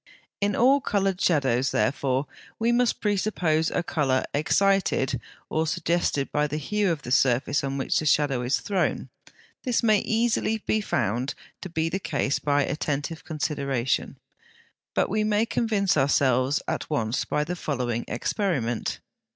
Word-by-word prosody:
In 205 -1 +1
all 270 +4 +4
coloured 195 -4 0
shadows, 135 -6 +2
therefore, 130 +4 0 0.3
we 230 +1 +1
must 240 0 +1
presuppose 185 -6 +1
a 175 - -1
colour 135 -6 +1
excited 155 - +1 0.3
or 160 +1 -1
suggested 170 -4 0
by 150 0 +1
the 150 +1 -3
hue 205 +5 0
of 155 -4 -3
the 125 - -6
surface 130 +2 +2
on 135 0 -2
which 135 - 0
the 155 - -2
shadow 140 -4 +2
is 125 +2 0
thrown. 195 -3 -1 0.5
This 250 -3 0
may 215 -2 +4
be - - -5
easily 225 -1 +1 0.2
found 120 - -1 0.3
to 185 - -6
be 160 -1 -1
the 180 +4 -2
case 140 -6 -1
by 145 -1 +2
attentive 150 +2 -3
consideration, 140 -5 -2 0.8
but - - +2
we 215 +2 0
may 215 +1 +2
convince 215 -5 +1
ourselves 135 -1 +2
at - - -3
once 115 -5 0
by 150 - -1
the 175 +4 -4
following 125 -8 -2
experiment. 120 - -1
68. - - -15
150 Hz, 150 wpm, -25 LUFS, 135-195 Hz, 0.8 s, all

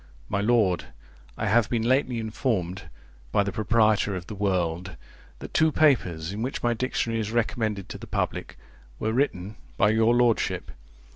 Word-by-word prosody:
My 100 - 0
Lord, 105 -6 +2 0.5
I - - -2
have 110 +1 +3
been 115 -2 0
lately 130 0 +2
informed, 105 -5 -2 0.4
by 100 - +3
the 100 - -3
proprietor 110 -1 +2
of 90 -1 -5
The 105 - -7
World, 90 -3 -1 0.4
that - - -10
two 160 0 +4
papers, 95 - +2
in 105 - -4
which 130 +3 -3
my 120 0 +2
Dictionary 115 -1 -1
is 110 -1 -3
recommended 110 -4 -1
to - - -7
the - - -9
public, - - -3 0.4
were 110 - -1
written 110 -6 -1 0.2
by 100 - +4
your 110 +2 +3
lordship. 120 -2 +1
110 Hz, 160 wpm, -26 LUFS, 100-120 Hz, 0.5 s, two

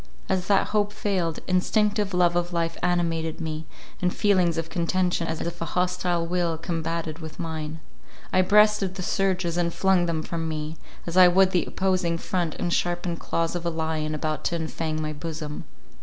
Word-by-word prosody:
As 185 -1 0
that 200 -1 +3
hope 205 -1 +1
failed, 180 -7 -1
instinctive 205 +2 +2
love 175 -1 +3
of 175 0 0
life 165 -1 -1
animated 165 -2 0
me, 160 -1 -4 0.3
and 180 0 +2
feelings 180 -5 +2
of 165 0 -2
contention, 175 0 0
as 160 0 -3
if 170 0 -5
a - - 0
hostile 180 -1 +1
will 170 -1 0
combated 165 -1 -3
with 160 -1 -9
mine. 160 -1 -4 0.5
I 185 - +5
breasted 210 0 +4
the 185 - -4
surges, 185 -3 0
and 170 -1 +1
flung 185 -1 +2
them 160 -2 -1
from 165 -1 -3
me, 155 0 -4 0.3
as 170 +1 -3
I 185 -1 +10
would 185 +1 +5
the 175 -4 +1
opposing 185 -3 0
front 170 -2 -2
and 175 - -1
sharpened 175 -1 -1
claws 165 +1 -1
of 175 - -3
a 170 - 0
lion 160 -1 -2
about 155 0 -2
to 170 - +1
enfang 160 -1 -3
my 155 0 -2
bosom. 155 -1 -6
170 Hz, 180 wpm, -25 LUFS, 160-185 Hz, 0.5 s, I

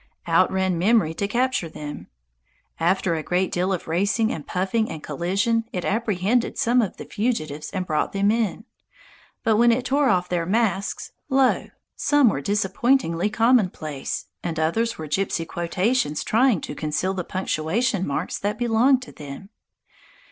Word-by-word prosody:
Out - - +3
ran 190 -2 0
Memory 200 -4 +3
to 200 +4 -2
capture 245 -6 0
them. 145 - -8 0.7
After 175 +1 +1
a 160 - -1
great 180 +3 0
deal 180 +2 0
of 185 - -3
racing 200 +7 +1
and 150 - -7
puffing 195 +5 0
and 155 - -7
collision 205 +6 0
it 180 - -3
apprehended 220 +1 0
some 245 +2 +3
of 210 - -3
the - - -8
fugitives 155 - -2
and 185 -2 -3
brought 155 -3 0
them 200 +1 +2
in. 220 -2 -1 0.8
But 220 -1 +3
when 235 +1 +5
it 245 +2 0
tore 275 +1 +2
off 180 -3 +2
their 170 -2 -1
masks, 200 -2 0 0.2
lo! 265 -1 +2 0.3
some 290 -5 +4
were 140 - -2
disappointingly 205 - +1
commonplace, 205 - 0 0.2
and 170 -2 -4
others 225 +9 0
were 160 - -6
gipsy 165 +1 -1
quotations 180 - -1
trying 230 - +3
to - - -6
conceal 155 +5 -1
the 185 -2 -3
punctuation 190 +4 -1
marks 145 +5 -2
that 205 +1 -2
belonged 245 +3 +3
to - - -11
them. 145 +6 -9
195 Hz, 155 wpm, -23 LUFS, 170-230 Hz, 0.8 s, when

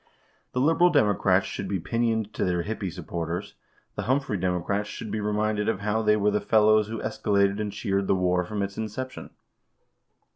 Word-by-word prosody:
The 125 - 0
liberal 165 +6 +4
Democrats 110 - +3
should - - -5
be 95 - -1
pinioned 110 +2 -1
to - - -2
their 90 -2 0
hippie 105 -2 -4
supporters. 85 0 -5 0.4
The - - -4
Humphrey 135 -4 +1
Democrats 95 +3 -1
should 110 - -6
be 110 - -2
reminded 105 0 0
of 105 -3 -1
how 105 +2 0
they 105 -1 +3
were 105 0 +2
the 105 - 0
fellows 110 -1 +4
who 115 +1 -4
escalated 100 -1 +1
and 105 -1 -2
cheered 100 -1 -1
the - - +3
war 90 -1 +1
from 100 +3 -3
its 100 0 -5
inception. 120 +4 -5
105 Hz, 180 wpm, -26 LUFS, 95-110 Hz, 0.4 s, liberal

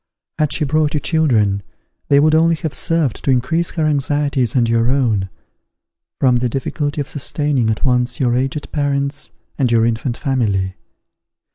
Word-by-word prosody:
Had 150 -2 +1
she 150 - -1
brought 155 +1 +1
you - - +2
children, 115 - +1 0.5
they 140 - +5
would 155 +2 +4
only 165 +1 +4
have 160 -3 -4
served 155 -2 -1
to - - -1
increase 135 +7 +1
her 160 -2 0
anxieties 145 -3 0
and 120 -2 +3
your 115 +1 +2
own, 115 -8 +1 0.9
from 125 -2 +3
the 120 0 0
difficulty 145 +4 -3
of 140 - -2
sustaining 145 -4 -1
at 110 - -1
once 125 -1 +1
your 120 -2 +2
aged 135 +3 -2
parents 140 -1 -1 0.3
and 130 -4 +2
your 115 -1 +3
infant 115 +1 -1
family. 100 -9 -1
135 Hz, 160 wpm, -18 LUFS, 120-150 Hz, 0.9 s, they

